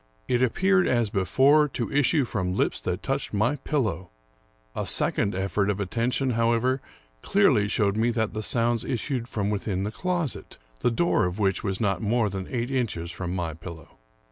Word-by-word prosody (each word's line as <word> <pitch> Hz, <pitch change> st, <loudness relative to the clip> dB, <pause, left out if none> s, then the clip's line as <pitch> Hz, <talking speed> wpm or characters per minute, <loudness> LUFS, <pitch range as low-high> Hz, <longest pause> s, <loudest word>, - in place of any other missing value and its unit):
It 125 Hz, -1 st, +1 dB
appeared, 185 Hz, +9 st, +3 dB
as 120 Hz, -4 st, +1 dB
before, 135 Hz, -, +4 dB
to 125 Hz, -3 st, -4 dB
issue 145 Hz, 0 st, +3 dB
from 95 Hz, -5 st, -2 dB
lips -, -, 0 dB
that -, -, -3 dB
touched -, -, -2 dB
my 120 Hz, +8 st, +1 dB
pillow. 110 Hz, -, -2 dB, 0.7 s
A -, -, -3 dB
second 100 Hz, -2 st, +2 dB
effort 100 Hz, +1 st, 0 dB
of 100 Hz, -1 st, -1 dB
attention, 120 Hz, +6 st, 0 dB
however, 115 Hz, +3 st, +1 dB, 0.4 s
clearly 140 Hz, -, +3 dB
showed 105 Hz, -2 st, +1 dB
me 115 Hz, +2 st, +2 dB
that 110 Hz, -2 st, -1 dB
the 110 Hz, -, -3 dB
sounds 115 Hz, +1 st, +1 dB
issued 125 Hz, -1 st, -2 dB
from 105 Hz, -4 st, -2 dB
within 95 Hz, -2 st, -2 dB
the 105 Hz, -, -3 dB
closet, 175 Hz, -2 st, -3 dB, 0.2 s
the -, -, +2 dB
door 120 Hz, -, +2 dB
of 90 Hz, +2 st, -5 dB
which 95 Hz, -3 st, 0 dB
was 95 Hz, -2 st, -2 dB
not 100 Hz, -2 st, 0 dB
more 110 Hz, -1 st, +1 dB
than 95 Hz, -1 st, -5 dB
eight 120 Hz, +1 st, -2 dB
inches 105 Hz, -10 st, -2 dB
from 90 Hz, 0 st, -4 dB
my 85 Hz, -3 st, -2 dB
pillow. 80 Hz, -1 st, -10 dB
115 Hz, 175 wpm, -26 LUFS, 100-130 Hz, 0.7 s, before